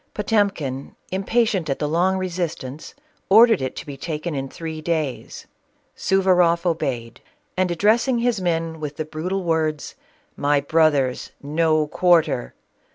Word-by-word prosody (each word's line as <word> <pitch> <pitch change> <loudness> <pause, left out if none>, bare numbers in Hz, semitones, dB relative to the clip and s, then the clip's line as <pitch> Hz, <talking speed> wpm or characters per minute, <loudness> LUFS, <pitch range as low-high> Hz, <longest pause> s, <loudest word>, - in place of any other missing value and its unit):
Potemkin, 200 - -1 0.2
impatient 195 -3 0
at 135 - 0
the 150 - -2
long 180 +5 +1
resistance, 170 - -4 0.3
ordered 225 - +6
it 130 - -3
to - - -7
be 145 - -7
taken 155 +3 -4
in 135 -1 -4
three 160 0 -6
days. 155 -5 -3 0.5
Suvaroff 180 -3 +2
obeyed, 125 -9 -2 0.3
and 185 -1 +1
addressing 220 +8 +2
his 235 -4 0
men 165 -2 -1
with 150 -1 -6
the 155 - -3
brutal 180 +5 -3
words 160 -3 -1 0.2
— - - -37
"My 145 0 +2
brothers, 145 -3 +1
no 155 +1 +1
quarter! 160 - +2
165 Hz, 135 wpm, -22 LUFS, 150-185 Hz, 0.5 s, ordered